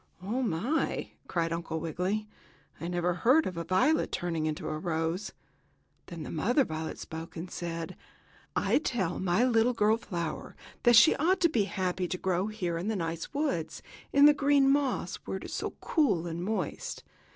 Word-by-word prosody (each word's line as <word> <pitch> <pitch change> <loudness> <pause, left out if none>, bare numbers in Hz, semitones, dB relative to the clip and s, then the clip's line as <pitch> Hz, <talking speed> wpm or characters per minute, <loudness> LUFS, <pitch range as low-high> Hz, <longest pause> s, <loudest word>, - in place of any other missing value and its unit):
"Oh, 230 +7 -1
my!" 235 - -1 0.2
cried 165 -1 -1
Uncle 165 -1 -3
Wiggily. 180 +7 -2 0.5
"I 165 - -4
never 175 0 0
heard 255 - +4
of 185 - -3
a 170 - -3
violet 185 - +2
turning 165 -3 -1
into 155 0 -3
a 155 0 -3
rose." 165 +3 -2 0.8
Then 170 -3 -7
the - - -6
mother 245 - +2
violet 160 0 -4
spoke 160 +1 -8
and 175 +2 -6
said: 165 -1 -5 0.6
"I - - +3
tell 195 - -1
my 185 +5 +2
little 240 0 +3
girl 220 -1 +3
flower 170 -8 -5 0.3
that 240 -1 +6
she 230 +7 +8
ought 355 +6 +2
to 340 - +5
be 225 -10 +2
happy 185 -1 -2
to 185 - -3
grow 185 +1 0
here 180 -6 -2
in 180 - -4
the 220 - 0
nice 165 -2 -3
woods, 220 - -2 0.3
in 280 +1 +6
the 295 - +9
green 280 -1 +4
moss, 280 -1 0
where - - -3
it - - -9
is - - -7
so - - -3
cool 210 - +2
and 170 0 -4
moist. 195 -5 -3
185 Hz, 180 wpm, -29 LUFS, 165-240 Hz, 0.8 s, the